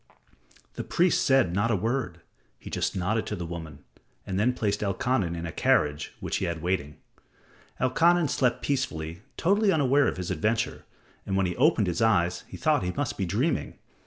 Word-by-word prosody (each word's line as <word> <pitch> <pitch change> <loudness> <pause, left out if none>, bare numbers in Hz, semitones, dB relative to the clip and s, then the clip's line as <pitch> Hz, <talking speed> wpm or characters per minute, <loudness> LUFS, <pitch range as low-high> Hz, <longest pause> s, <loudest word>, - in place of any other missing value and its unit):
The - - -3
priest 175 +1 +2
said 135 - +3
not 100 +5 +1
a 115 - +2
word. 110 -4 -2 0.4
He - - -11
just - - -1
nodded 105 +5 -1
to 105 - -3
the 90 -3 -5
woman, 80 -4 -8 0.4
and 95 -1 -2
then 115 +4 +3
placed 105 -3 -1
Elkanan 100 -3 0
in 85 0 -5
a 80 - -4
carriage 75 -1 +1
which - - -2
he - - -1
had 85 -2 -2
in 80 - -11
waiting. 80 -5 -2 0.8
Elkanan 165 +6 +3
slept 125 -3 0
peacefully, 85 - -2 0.2
totally 200 +3 +3
unaware 145 -3 +3
of - - -2
his 90 0 -4
adventure, 110 +6 -1 0.4
and 95 - -2
when 95 - +2
he 90 - -2
opened 130 -5 +3
his 90 +1 -2
eyes 90 -6 +2
he - - -9
thought - - +2
he 90 0 -2
must 140 -4 -2
be 95 - -2
dreaming. 120 - -1
100 Hz, 190 wpm, -27 LUFS, 85-130 Hz, 0.8 s, said